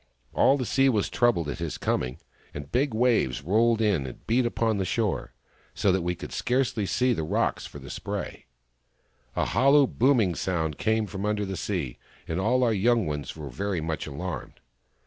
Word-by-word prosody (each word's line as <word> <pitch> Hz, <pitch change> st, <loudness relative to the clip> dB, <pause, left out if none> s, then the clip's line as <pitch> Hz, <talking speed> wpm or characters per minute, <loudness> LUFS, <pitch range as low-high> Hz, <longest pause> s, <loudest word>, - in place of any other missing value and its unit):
All 135 Hz, -, +4 dB
the 130 Hz, -, -2 dB
sea 135 Hz, +3 st, +3 dB
was 105 Hz, -6 st, +1 dB
troubled 105 Hz, -10 st, +2 dB
at 75 Hz, -, -4 dB
his 85 Hz, -2 st, -3 dB
coming, 65 Hz, +2 st, -1 dB, 0.4 s
and 75 Hz, 0 st, -7 dB
big 135 Hz, +5 st, +1 dB
waves 110 Hz, -, +1 dB
rolled 115 Hz, +6 st, +3 dB
in 95 Hz, -11 st, +1 dB
and 65 Hz, -, -11 dB
beat 120 Hz, +2 st, +2 dB
upon 115 Hz, -3 st, 0 dB
the -, -, +1 dB
shore, 100 Hz, +1 st, -1 dB, 0.4 s
so 100 Hz, -, +2 dB
that 95 Hz, 0 st, +1 dB
we 90 Hz, +1 st, -1 dB
could -, -, -8 dB
scarcely 125 Hz, -5 st, 0 dB
see 125 Hz, +4 st, +2 dB
the 95 Hz, -, -2 dB
rocks 75 Hz, -, -1 dB
for -, -, -11 dB
spray. -, -, -5 dB, 0.9 s
A -, -, +1 dB
hollow 140 Hz, -, +5 dB
booming 120 Hz, -7 st, +2 dB
sound 80 Hz, -4 st, -2 dB
came 110 Hz, 0 st, +1 dB
from 100 Hz, -1 st, -6 dB
under 105 Hz, 0 st, 0 dB
the 95 Hz, 0 st, -4 dB
sea, 85 Hz, -12 st, -3 dB, 0.3 s
and 80 Hz, +2 st, -2 dB
all 125 Hz, +6 st, +2 dB
our 115 Hz, -2 st, +3 dB
young 115 Hz, +1 st, +2 dB
ones 75 Hz, -3 st, -4 dB
were 75 Hz, -4 st, -7 dB
very 100 Hz, +7 st, -2 dB
much 80 Hz, 0 st, -3 dB
alarmed. 85 Hz, +5 st, -6 dB
100 Hz, 185 wpm, -27 LUFS, 80-120 Hz, 0.9 s, hollow